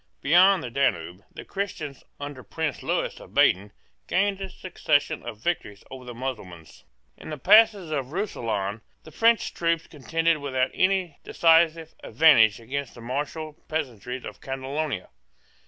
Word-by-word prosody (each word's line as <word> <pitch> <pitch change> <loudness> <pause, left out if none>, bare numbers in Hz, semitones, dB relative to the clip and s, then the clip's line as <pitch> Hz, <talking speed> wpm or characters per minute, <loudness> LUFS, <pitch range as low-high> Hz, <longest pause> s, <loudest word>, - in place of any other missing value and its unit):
Beyond 180 +4 +5
the 120 - -6
Danube, 90 -9 -1
the - - -10
Christians, 190 -8 -5 0.2
under 145 -2 -7
Prince 150 +5 -4
Lewis - - -2
of - - -15
Baden, 100 +3 +3 0.4
gained 195 0 +1
a 195 - -4
succession 160 -4 -1
of 110 - -7
victories 105 -13 -3
over 130 -1 -9
the 120 -1 -8
Mussulmans. 95 - -7 0.3
In - - -10
the 155 - -5
passes 205 - +5
of 135 -3 -3
Roussillon, 115 - -3 0.2
the 160 - -13
French 230 +4 +2
troops 165 -1 0
contended 165 +2 0
without 130 -2 -1
any 185 -4 0
decisive 165 -1 +3
advantage 120 -10 +5
against 135 +3 -5
the 120 - -11
martial 150 +5 -4
peasantry 125 -4 -4
of - - -9
Catalonia. 135 -3 -4
145 Hz, 140 wpm, -25 LUFS, 125-165 Hz, 0.4 s, Beyond